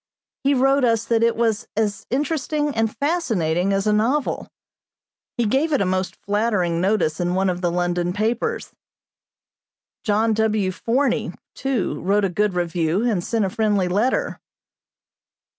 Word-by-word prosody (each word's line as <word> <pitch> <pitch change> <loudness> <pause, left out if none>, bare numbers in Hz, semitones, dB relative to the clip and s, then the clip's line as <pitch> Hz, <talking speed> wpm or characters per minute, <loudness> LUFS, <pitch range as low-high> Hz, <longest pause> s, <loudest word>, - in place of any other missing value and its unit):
He 280 +1 +3
wrote 270 +1 +3
us 230 -2 +2
that 230 -1 +1
it 230 0 +3
was 225 -2 0
as 205 -2 -1
interesting 295 +2 -1
and 225 -1 -1
fascinating 200 - 0
as 195 +1 0
a 210 - +3
novel. 250 +7 0 0.9
He 240 - +1
gave 270 +9 +1
it 280 - +3
a 200 - +1
most 185 0 -1
flattering 200 -5 0
notice 190 -5 +1
in 175 0 0
one 190 0 +2
of 180 0 -5
the 175 - +1
London 175 0 0
papers. 230 - -2 1.3
John 220 +1 +2
W. 215 -3 +1
Forney, 250 +8 0 0.2
too, 265 -7 -2
wrote 200 +2 +2
a - - 0
good 205 +1 0
review 175 +2 0
and 210 -8 0
sent 225 0 0
a - - -1
friendly 205 -4 +1
letter. 240 - 0
210 Hz, 150 wpm, -22 LUFS, 185-240 Hz, 1.3 s, He